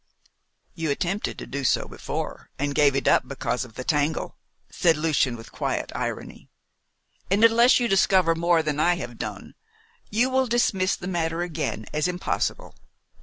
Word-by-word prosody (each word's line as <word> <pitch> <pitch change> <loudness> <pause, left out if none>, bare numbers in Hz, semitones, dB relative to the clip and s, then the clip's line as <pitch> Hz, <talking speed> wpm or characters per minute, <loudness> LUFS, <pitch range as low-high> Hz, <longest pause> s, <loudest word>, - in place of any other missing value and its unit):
"You 165 -2 -3
attempted 180 +8 -2
to - - -7
do 140 0 -5
so - - +1
before, - - -6
and 145 +1 -1
gave 140 -1 +4
it 135 - -1
up 130 - +4
because 130 -2 -2
of 115 -3 -12
the 130 - -5
tangle," 150 +2 0 0.4
said 165 -3 +3
Lucian 150 -5 +1
with 115 -1 -11
quiet - - -3
irony. - - -5 0.8
"And 200 +4 +2
unless 235 +3 +6
you 240 - +1
discover 190 -4 +4
more 170 0 +2
than 150 -1 -2
I 175 +3 +3
have 120 -7 -7
done, - - -6 0.6
you 240 +5 +1
will 260 0 +2
dismiss 205 -6 +1
the 180 - -7
matter 170 -2 -1
again 165 -3 -3
as 150 +1 +1
impossible. 180 - -2
165 Hz, 165 wpm, -25 LUFS, 145-190 Hz, 0.8 s, unless